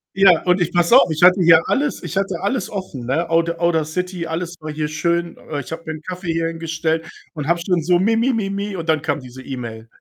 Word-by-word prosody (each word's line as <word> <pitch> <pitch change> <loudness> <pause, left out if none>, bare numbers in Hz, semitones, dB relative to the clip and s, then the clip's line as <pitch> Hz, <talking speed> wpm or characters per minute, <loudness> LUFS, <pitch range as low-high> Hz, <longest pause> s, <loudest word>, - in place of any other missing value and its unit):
Ja, 195 -4 +6
und 180 +1 +2
ich 175 0 -1
passe 175 +7 +4
auf, 175 - +4
ich 155 +3 -3
hatte 180 +2 +7
hier 165 -1 +7
alles 290 +1 0
ich 190 - -5
hatte 195 -1 -1
alles 240 +6 -1
offen, 185 - -6
ne? 160 +7 -1
Aud 165 0 +2
Audacity 170 +1 -1
alles 170 +2 -4
war 155 0 -6
hier 150 0 -2
schön. 170 +2 -1 0.2
Ich 135 - -8
habe 165 +1 -6
mir 160 - -4
'n 155 - -9
Kaffee 180 -1 -4
hierhin 165 0 -2
gestellt 165 0 -2 0.3
und 150 -2 -5
habe 170 0 +2
schon 170 -2 0
so 175 +1 +3
mi 225 +4 +2
mi 250 +3 +2
mi 205 -4 -1
mi 200 0 -3
und 165 -2 -5
dann 155 -1 +2
kam 150 -2 -1
diese 130 0 -11
E-Mail. 115 -4 -7
170 Hz, 240 wpm, -20 LUFS, 155-180 Hz, 0.3 s, hatte